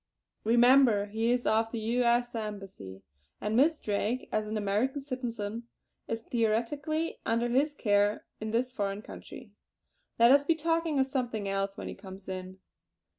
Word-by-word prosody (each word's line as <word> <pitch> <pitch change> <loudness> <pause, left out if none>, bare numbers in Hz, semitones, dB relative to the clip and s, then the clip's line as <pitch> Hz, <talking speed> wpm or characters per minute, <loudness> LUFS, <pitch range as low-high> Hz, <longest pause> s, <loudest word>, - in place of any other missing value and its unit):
Remember 240 -2 +5
he 220 +3 -1
is 245 0 0
of 225 +1 +2
the 230 - -3
U. 230 +3 0
S. 240 0 +2
Embassy; 195 - -7 0.4
and 210 +2 -2
Miss 300 +6 +4
Drake, 215 +3 -2
as 215 0 0
an 215 +1 -2
American 215 +7 0
citizen, 235 -5 -5 0.4
is 225 0 -3
theoretically 255 +9 -1
under 230 +1 +1
his 285 +5 +2
care 205 -3 +2
in 220 - -4
this 240 +3 0
foreign 200 -3 -3
country. - - -11 0.7
Let 235 +1 +7
us 280 +1 +6
be 325 +3 +2
talking 330 -1 0
of 265 - +4
something 245 -6 -2
else 195 0 -2
when - - -6
he - - -5
comes 190 -1 -11
in!" 185 0 -6
230 Hz, 160 wpm, -30 LUFS, 205-255 Hz, 0.7 s, Let